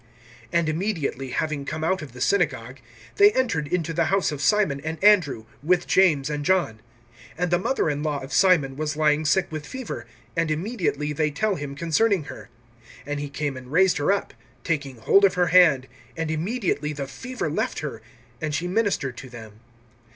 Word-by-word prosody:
(29)And 170 -2 +1
immediately, 155 -5 -2
having 150 +2 -2
come 155 +3 -4
out 190 +3 0
of 150 -4 -8
the 125 - -10
synagogue, 135 - 0 0.4
they 410 +1 +7
entered 160 -13 0
into 165 0 -1
the 170 0 +1
house 195 +1 +1
of 145 -2 -5
Simon 190 -8 +2
and 160 +1 -4
Andrew, 175 - +4 0.2
with 175 +4 +2
James 160 -8 +3
and 150 -1 -3
John. 170 -11 +1 0.6
(30)And 180 +1 0
the 175 - +3
mother 265 +3 0
in 145 -1 -1
law 150 -2 -1
of 135 +1 -8
Simon 155 -7 +3
was 150 +1 -3
lying 155 0 +2
sick 180 +4 +3
with 155 -1 -5
fever; 215 - -6 0.3
and 165 -1 0
immediately 155 - -2
they 150 +1 +1
tell 205 +9 0
him 145 -5 -5
concerning 170 +4 +1
her. 145 - -10 0.6
(31)And 145 +1 -3
he 145 0 -4
came 145 -1 -3
and 130 0 -10
raised 185 +3 +4
her 145 +6 +2
up, 200 - -1 0.3
taking 140 -5 -2
hold 195 - +4
of 195 - +4
her 180 -1 +2
hand; 160 -8 +6 0.3
and 165 -1 -2
immediately 160 - -1
the 140 -1 -4
fever 250 - -5
left 155 - -2
her, 135 -7 -6 0.4
and 155 -1 -2
she 175 - -2
ministered 185 - 0
to 130 - -9
them. 110 -3 -12
155 Hz, 190 wpm, -24 LUFS, 145-185 Hz, 0.6 s, they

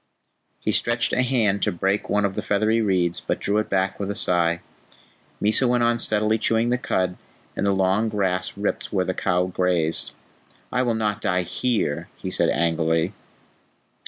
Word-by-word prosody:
He - - -1
stretched 120 0 +1
a 125 - +3
hand 115 -6 +1
to 105 - +2
break 95 +3 -1
one 105 0 +2
of 100 - -1
the - - -3
feathery 110 +3 +1
reeds, 90 -5 +1
but - - -3
drew 105 +1 0
it 110 - -3
back 95 0 0
with 100 -1 -3
a 100 - -2
sigh. 85 -1 +2 0.8
Mysa 110 +5 +3
went 120 0 +2
on 120 0 +2
steadily 110 0 +1
chewing 115 +2 +2
the 125 0 +1
cud, 90 -6 -1 0.4
and 100 - -1
the - - +3
long 95 +3 +1
grass 95 -3 -1
ripped 100 0 -2
where 95 -3 +1
the 95 - -1
cow 90 -1 0
grazed. 90 -3 0 0.6
"I 125 - +1
will 120 -3 +1
not 105 -1 -1
die 90 -1 +1
HERE," 110 -6 -1
he - - -5
said - - +1
angrily. 80 +2 +1
100 Hz, 180 wpm, -23 LUFS, 90-110 Hz, 0.8 s, a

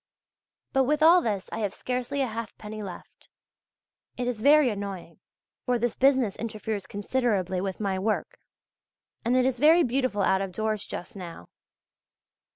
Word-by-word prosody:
But 270 -1 +3
with 300 +3 +1
all 345 +3 +7
this 205 - -2
I - - -4
have 205 -3 -2
scarcely 255 +2 -2
a - - +2
halfpenny 220 -2 -6
left. 190 -4 -10 0.9
It 245 - -2
is 240 -3 -2
very 290 -1 +6
annoying, 200 -5 -6 0.5
for 250 -1 +2
this 235 -1 -1
business 260 -6 +3
interferes 215 -3 -4
considerably 200 -4 -1
with 190 -1 -4
my 195 -3 -1
work, 215 +3 -2 0.8
and 245 +3 +2
it 255 - +3
is 260 -2 0
very 320 +4 +6
beautiful 250 -5 0
out 190 0 +3
of 195 -2 -4
doors 215 0 -2
just 220 +6 -7
now. 170 - -9
220 Hz, 155 wpm, -27 LUFS, 200-255 Hz, 0.9 s, all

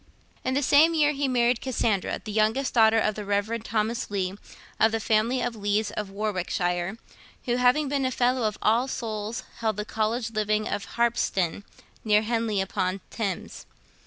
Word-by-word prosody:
In 260 - -1
the 285 - +1
same 310 +5 +5
year 300 -2 +4
he 280 -1 -1
married 245 -1 +2
Cassandra, 225 -6 0
youngest 220 +5 +1
daughter 225 -1 +5
of 215 -1 +1
the 210 - -6
Rev. 205 +3 -1
Thomas 225 +1 -1
Leigh, 190 -2 -1 0.5
of 220 - +5
the 225 - 0
family 225 +4 +1
of 245 -1 -2
Leighs 205 0 0
of 210 -2 -4
Warwickshire, 185 -2 -2 0.5
who, 245 -1 +1
having 250 +4 +3
been 275 0 0
a - - +2
fellow 250 -1 +1
of 215 - -4
All 230 +4 +3
Souls, 220 -3 -4 0.2
held 220 -3 -1
the 210 - -3
College 220 +2 -1
living 215 0 0
of 200 - -3
Harpsden, 205 -6 0 0.4
near 210 -1 +3
Henley 225 -3 0
upon 190 0 -2
Thames. 200 -6 -4
220 Hz, 165 wpm, -26 LUFS, 210-245 Hz, 0.5 s, same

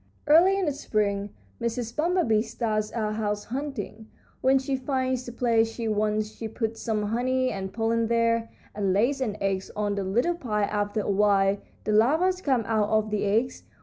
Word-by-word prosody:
Early 340 +6 +6
in 390 - 0
the 300 - +1
spring 205 -6 -1 0.3
Mrs. 235 0 -3
Bumblebee 320 -9 +2
starts 220 -2 -2
out 215 -2 -2
house 210 -1 -1
hunting. 230 -4 -5 0.3
When 265 +1 +4
she 270 +1 -1
finds 260 -1 -1
the - - -5
place 230 -2 +2
she 230 0 -4
wants 215 0 0
she 225 - -6
puts 225 0 -4
some 215 -3 -1
honey 255 +4 0
and 190 -1 -4
pollen 225 +1 0
there, 230 0 +1 0.2
and 200 -2 0
lays 250 +8 +1
an 215 -5 -2
egg 195 -1 0
on 210 -1 0
the 200 -1 -2
little 240 - +1
pile. 210 -11 -1
After 205 +1 -1
a 205 - -1
while 200 0 +3 0.2
the 215 - -1
larvas 320 +13 +3
come 260 -8 +1
out 215 -1 +1
of 215 0 +1
the 210 -1 0
eggs. 225 +5 0
225 Hz, 180 wpm, -26 LUFS, 210-255 Hz, 0.3 s, Early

